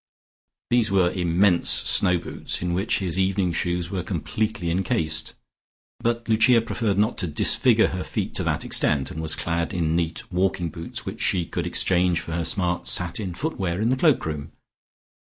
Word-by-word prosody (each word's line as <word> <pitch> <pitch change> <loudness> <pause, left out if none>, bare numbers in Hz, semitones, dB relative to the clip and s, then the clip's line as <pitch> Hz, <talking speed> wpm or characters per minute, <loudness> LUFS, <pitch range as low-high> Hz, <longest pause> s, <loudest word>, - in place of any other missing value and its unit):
These 120 -2 +3
were 95 -3 +2
immense 90 +1 +2
snow 90 -3 +5
boots, 85 - -4
in 90 -1 -1
which 95 +5 0
his 90 -2 -2
evening 95 -2 0
shoes 85 0 -2
were 95 -2 -2
completely 90 +1 -3
encased, 80 -3 -1 0.6
but 115 0 -2
Lucia 115 +2 +4
preferred 115 -3 -2
not 105 +4 +1
to 90 - -1
disfigure 75 -2 +2
her - - -4
feet - - -4
to - - -1
that - - -1
extent, 70 -3 +1
and 80 - -6
was 80 -1 0
clad 85 +2 -2
in 80 -2 0
neat 85 -1 -2
walking 90 -1 0
boots 85 +2 -7
which - - -6
she 90 -3 +1
could - - -4
exchange 90 -1 +1
for - - -8
her 85 0 -2
smart 90 +1 0
satin 90 +1 0
footwear 95 - -3
in 110 +2 +1
the 130 - +2
cloak 145 0 +2
room. 75 -2 -5
90 Hz, 175 wpm, -23 LUFS, 85-100 Hz, 0.6 s, snow